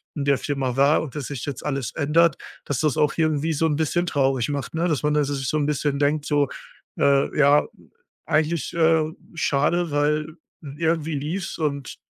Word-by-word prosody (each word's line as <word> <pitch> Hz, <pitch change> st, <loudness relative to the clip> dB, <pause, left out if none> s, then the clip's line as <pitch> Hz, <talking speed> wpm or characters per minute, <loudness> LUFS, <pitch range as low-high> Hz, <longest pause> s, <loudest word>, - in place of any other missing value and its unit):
in 145 Hz, -, -2 dB
der 140 Hz, -1 st, +3 dB
Firma 135 Hz, -3 st, -2 dB
war 140 Hz, +3 st, +4 dB
und 145 Hz, -6 st, -7 dB
das 140 Hz, -, -4 dB
sich 140 Hz, -5 st, -5 dB
jetzt 140 Hz, -3 st, -6 dB
alles 135 Hz, -5 st, -2 dB
ändert, 160 Hz, +1 st, +3 dB, 0.3 s
dass 140 Hz, -4 st, -3 dB
das 150 Hz, -4 st, +1 dB
auch 150 Hz, -1 st, +2 dB
irgendwie 155 Hz, -1 st, +1 dB
so 160 Hz, +1 st, 0 dB
'n 155 Hz, -2 st, +1 dB
bisschen 160 Hz, +3 st, 0 dB
traurig 135 Hz, -6 st, +1 dB
macht, 145 Hz, -2 st, -4 dB
ne? 165 Hz, +2 st, 0 dB
Dass 150 Hz, -7 st, -1 dB
man 150 Hz, 0 st, +2 dB
da 150 Hz, -1 st, +2 dB
sich 135 Hz, -2 st, -3 dB
so 155 Hz, -, 0 dB
'n 150 Hz, -, +1 dB
bisschen 145 Hz, -1 st, -1 dB
denkt 145 Hz, +1 st, +1 dB
so, 145 Hz, -2 st, +2 dB, 0.5 s
äh: 140 Hz, +1 st, +2 dB
„Ja, 145 Hz, 0 st, +5 dB, 0.6 s
eigentlich, 155 Hz, -1 st, 0 dB
äh, 160 Hz, -1 st, +3 dB, 0.3 s
schade, 165 Hz, +2 st, +1 dB
weil 150 Hz, +2 st, 0 dB, 0.4 s
irgendwie 160 Hz, -1 st, 0 dB
lief's 170 Hz, +7 st, -4 dB
und 140 Hz, -5 st, -3 dB
150 Hz, 190 wpm, -23 LUFS, 140-160 Hz, 0.6 s, Ja